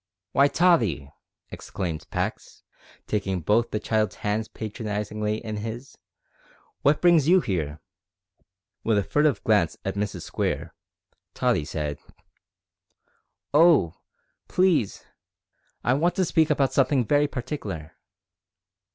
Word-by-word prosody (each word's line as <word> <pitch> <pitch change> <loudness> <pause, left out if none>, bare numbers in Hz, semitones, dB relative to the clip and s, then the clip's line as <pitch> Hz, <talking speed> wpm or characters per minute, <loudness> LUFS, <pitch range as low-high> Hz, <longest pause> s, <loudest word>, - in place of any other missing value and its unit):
"W'y, 140 +1 +4
Tottie!" 115 - +2 0.4
exclaimed 85 -5 -5
Pax, - - -4 0.4
taking 95 -3 -2
both 110 +8 +2
the 105 - -2
child's 110 -1 0
hands 105 +1 -2
patronisingly 105 -1 -3
in 110 -1 -4
his, 115 +5 -6 0.9
"what 145 +2 +3
brings 170 -5 +5
you 185 +2 +6
here?" 80 - -3 1.0
With 110 -2 +2
a 100 - +2
furtive 150 +6 +1
glance 105 -7 +2
at 95 - -1
Mrs 100 0 -3
Square, - - -3 0.6
Tottie 75 - +1
said, 75 -2 -4 1.5
"Oh! 155 - +5 0.5
please, 180 - +1 0.8
I 125 - +3
want 170 +6 +1
to 190 - +2
speak 160 -1 +2
about 135 -3 +1
something 135 -2 +2
very 145 +4 +3
partikler." 105 - -5
110 Hz, 110 wpm, -25 LUFS, 100-145 Hz, 1.5 s, you